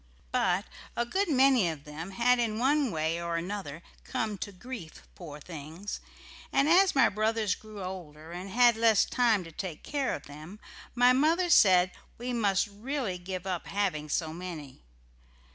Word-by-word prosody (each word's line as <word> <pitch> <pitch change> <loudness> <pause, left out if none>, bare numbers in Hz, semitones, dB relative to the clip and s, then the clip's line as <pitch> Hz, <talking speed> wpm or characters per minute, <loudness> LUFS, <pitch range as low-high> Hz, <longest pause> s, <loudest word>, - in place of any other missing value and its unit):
But - - +1 0.3
a 235 - 0
good 385 +9 0
many 260 - +4
of 155 -3 -6
them 155 +4 -7
had 240 +5 +2
in 220 -3 0
one 275 +3 +2
way 160 -1 -1
or 170 0 -2
another 175 -3 -5 0.2
come 220 -5 -2
to 205 - -5
grief, 195 -3 -9
poor 150 -5 -10
things, 160 +5 -7 0.5
and 275 - +3
as 365 +2 +5
my 270 - +6
brothers 215 -1 0
grew 215 -1 -9
older 165 -4 -8
and 180 +3 -6
had 240 +2 +5
less 225 -2 +4
time 230 -6 +2
to 165 - -11
take 165 -2 -6
care 280 -3 -1
of 145 - -9
them, 155 +8 -11 0.4
my 245 +1 +6
mother 330 +6 +2
said 185 - +6 0.3
we 245 +1 -4
must 200 -4 +2
really 215 -1 -4
give 185 +1 -6
up 185 -3 -3
having 185 -7 -1
so 160 +1 -1
many. 165 -6 -8
200 Hz, 165 wpm, -29 LUFS, 170-245 Hz, 0.5 s, my